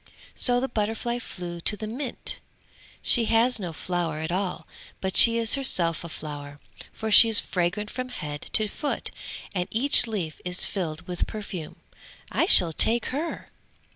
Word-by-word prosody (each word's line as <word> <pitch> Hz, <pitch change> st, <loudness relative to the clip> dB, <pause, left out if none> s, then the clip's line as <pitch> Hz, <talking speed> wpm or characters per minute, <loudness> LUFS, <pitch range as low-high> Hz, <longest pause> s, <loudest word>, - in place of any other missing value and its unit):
So 245 Hz, -1 st, +4 dB
the 265 Hz, -, -2 dB
butterfly 225 Hz, +1 st, -3 dB
flew 175 Hz, -6 st, -8 dB
to 210 Hz, -, +1 dB
the 215 Hz, -, -6 dB
mint. 245 Hz, +4 st, -5 dB, 0.6 s
"She 235 Hz, -2 st, +2 dB
has 230 Hz, +2 st, +2 dB
no 180 Hz, -4 st, -5 dB
flower 170 Hz, -1 st, -4 dB
at 160 Hz, +1 st, -4 dB
all, 185 Hz, 0 st, -3 dB, 0.3 s
but 190 Hz, 0 st, -4 dB
she 230 Hz, 0 st, +8 dB
is 230 Hz, -1 st, +1 dB
herself 175 Hz, -13 st, +1 dB
a 170 Hz, -, -8 dB
flower, 145 Hz, -2 st, -9 dB, 0.3 s
for 220 Hz, 0 st, -5 dB
she 225 Hz, +2 st, +8 dB
is 220 Hz, 0 st, +3 dB
fragrant 195 Hz, +3 st, -3 dB
from 255 Hz, 0 st, -6 dB
head 150 Hz, -11 st, -5 dB
to 215 Hz, -, +6 dB
foot 285 Hz, +8 st, -4 dB, 0.4 s
and 180 Hz, -2 st, -2 dB
each 250 Hz, +2 st, +4 dB
leaf 185 Hz, -9 st, -5 dB
is 180 Hz, 0 st, 0 dB
filled 175 Hz, -3 st, -5 dB
with 180 Hz, -1 st, -3 dB
perfume. 195 Hz, -7 st, -7 dB, 0.6 s
I -, -, +1 dB
shall 165 Hz, -2 st, +7 dB
take 230 Hz, +7 st, +1 dB
her!" 315 Hz, +5 st, -5 dB
205 Hz, 165 wpm, -25 LUFS, 170-230 Hz, 0.6 s, she